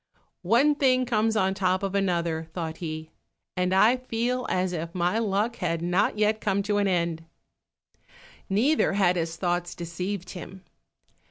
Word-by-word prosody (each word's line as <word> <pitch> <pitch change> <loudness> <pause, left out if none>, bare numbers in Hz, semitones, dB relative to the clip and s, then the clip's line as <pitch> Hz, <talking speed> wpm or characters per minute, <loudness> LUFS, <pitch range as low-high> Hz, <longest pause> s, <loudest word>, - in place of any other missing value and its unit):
"One 240 +11 +4
thing 255 -3 +2
comes 225 -2 +1
on 190 -1 +2
the 195 - -11
top 185 0 +1
of 195 -1 -2
another," 170 -4 0
thought 160 -3 -4
he, 155 -1 -6 0.4
"and 180 0 0
I 215 +6 +5
feel 250 0 -2
as 185 0 0
if 170 +1 -5
my 180 +5 +1
luck 220 +2 0
had 170 -2 -2
not 180 +4 +1
yet 215 +1 +1
come 200 -1 0
to 205 0 0
an 205 -1 +2
end." 170 -3 0 1.3
Neither 240 +10 +2
had 190 -3 +3
his 165 -1 -2
thoughts 175 0 -2
deceived 180 +3 -5
him. 185 +1 -9
190 Hz, 160 wpm, -26 LUFS, 175-215 Hz, 1.3 s, I